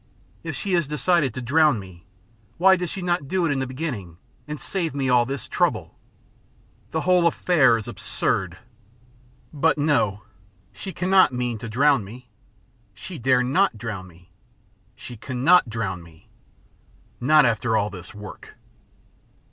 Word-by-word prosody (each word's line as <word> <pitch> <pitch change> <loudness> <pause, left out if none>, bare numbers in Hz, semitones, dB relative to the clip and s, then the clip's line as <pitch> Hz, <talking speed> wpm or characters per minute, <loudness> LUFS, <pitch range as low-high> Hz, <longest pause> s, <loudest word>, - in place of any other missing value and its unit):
If - - -5
she 200 -2 -3
has 170 -5 +2
decided 150 0 +1
to 130 - -5
drown 150 +2 +3
me, 95 -3 -12 0.5
why 190 +2 +6
did 180 -2 -3
she 190 +1 -6
not 175 -5 -1
do 185 +2 0
it 160 - +1
in 140 - 0
the 130 - -2
beginning 125 - -5 0.3
and 150 -1 -6
save 170 -7 -3
me 135 -2 -1
all 120 -1 +4
this 135 -3 -5
trouble? - - -1 0.9
The 160 - -2
whole 180 -1 +3
affair 150 -9 +3
is 110 - -7
absurd.... 95 -2 -2 1.0
But 155 +2 +2
no, 145 -9 +1 0.5
she 190 - -7
cannot 185 -4 +3
mean 125 -2 -2
to 115 - -7
drown 135 +1 +3
me. 120 +6 -12 0.7
She 180 - -8
dare 125 +1 +3
not 135 - +1
drown 105 -4 -6
me. 90 0 -20 0.6
She 120 - -10
cannot 130 +6 +3
drown 105 -5 -3
me. 85 -1 -18 0.9
Not 150 +3 +5
after 110 -1 +1
all 105 0 -1
this 90 -2 -10
work." 105 0 -11
130 Hz, 150 wpm, -23 LUFS, 110-160 Hz, 1.0 s, why